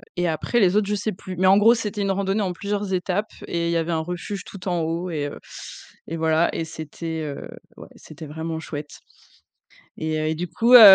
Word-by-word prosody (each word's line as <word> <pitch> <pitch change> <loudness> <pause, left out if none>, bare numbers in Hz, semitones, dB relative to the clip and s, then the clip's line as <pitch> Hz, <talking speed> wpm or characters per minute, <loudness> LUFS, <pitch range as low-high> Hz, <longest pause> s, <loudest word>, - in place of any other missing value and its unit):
et 175 -1 +1
après 165 +9 +1
les 190 -2 +4
autres, 210 -1 +3
je 210 - +2
sais 205 +2 -1
plus 185 -1 -7
mais, 185 - +2
en 195 +1 +7
gros, 230 +3 +7
c'était 210 -2 -3
une 195 - +1
randonnée 195 +2 +1
en 185 -2 0
plusieurs 200 +1 -2
étapes 185 +3 0 0.2
et 170 0 0
il - - +1
y 170 - +2
avait 165 +1 0
un 160 - +1
refuge 180 +4 -4
tout 190 -1 -9
en 175 -2 +1
haut 165 +3 -1
et 145 -3 -1
heu - - -7 0.7
et 165 - -3
voilà 160 +1 +3
et 165 - -1
c'était, 160 +1 -5
heu, 145 -2 -5 0.3
ouais, - - -10
c'était 155 +1 -11
vraiment 160 +2 -4
chouette 150 -2 -6 1.1
et 155 0 -1
heu 155 - 0
et 160 - +1
du 175 +2 -3
coup, 240 +2 +4
heu 215 -5 +13
175 Hz, 230 wpm, -24 LUFS, 160-200 Hz, 1.1 s, heu